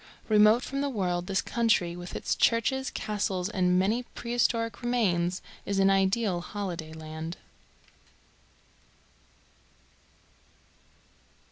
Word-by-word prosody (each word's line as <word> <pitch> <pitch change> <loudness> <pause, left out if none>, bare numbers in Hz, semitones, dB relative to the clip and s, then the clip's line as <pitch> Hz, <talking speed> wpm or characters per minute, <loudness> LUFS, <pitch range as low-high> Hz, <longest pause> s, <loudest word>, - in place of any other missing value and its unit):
Remote 215 +3 +5
from 275 +1 -3
the 285 - 0
world, 180 -7 -1
this 190 -1 0
country, 210 -7 +1
with 175 0 -8
its - - -1
churches, 265 +3 +2
castles, 200 -3 -2
and 180 -3 +2
many 210 +6 +2
prehistoric 230 -2 0
remains, 185 -7 0 0.2
is 200 - -2
an 195 0 +4
ideal 195 -1 +1
holiday 175 -5 -5
land. 160 +1 -7
195 Hz, 100 wpm, -28 LUFS, 175-230 Hz, 0.2 s, Remote